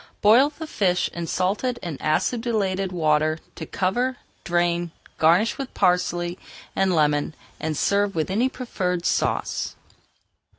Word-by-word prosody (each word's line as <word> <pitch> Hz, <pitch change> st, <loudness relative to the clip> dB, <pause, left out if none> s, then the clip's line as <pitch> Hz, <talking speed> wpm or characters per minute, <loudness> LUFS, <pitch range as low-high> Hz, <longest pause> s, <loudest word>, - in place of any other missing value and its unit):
Boil 235 Hz, +7 st, +6 dB
the 315 Hz, +2 st, -8 dB
fish 185 Hz, -, 0 dB
in 170 Hz, -1 st, -4 dB
salted 210 Hz, +9 st, 0 dB
and 165 Hz, -5 st, -5 dB
acidulated 195 Hz, +2 st, 0 dB
water 155 Hz, -2 st, +2 dB, 0.2 s
to 160 Hz, -, -7 dB
cover, 245 Hz, +7 st, 0 dB, 0.3 s
drain, 175 Hz, 0 st, +1 dB, 0.3 s
garnish 175 Hz, -, +3 dB
with 270 Hz, -1 st, -6 dB
parsley 180 Hz, -1 st, +1 dB, 0.4 s
and 190 Hz, -2 st, +2 dB
lemon, 150 Hz, 0 st, +1 dB, 0.2 s
and 155 Hz, -1 st, -2 dB
serve 200 Hz, +2 st, +1 dB
with 160 Hz, +2 st, -1 dB
any 235 Hz, +7 st, +2 dB
preferred 180 Hz, -9 st, -3 dB
sauce. -, -, 0 dB
180 Hz, 125 wpm, -24 LUFS, 170-215 Hz, 0.4 s, Boil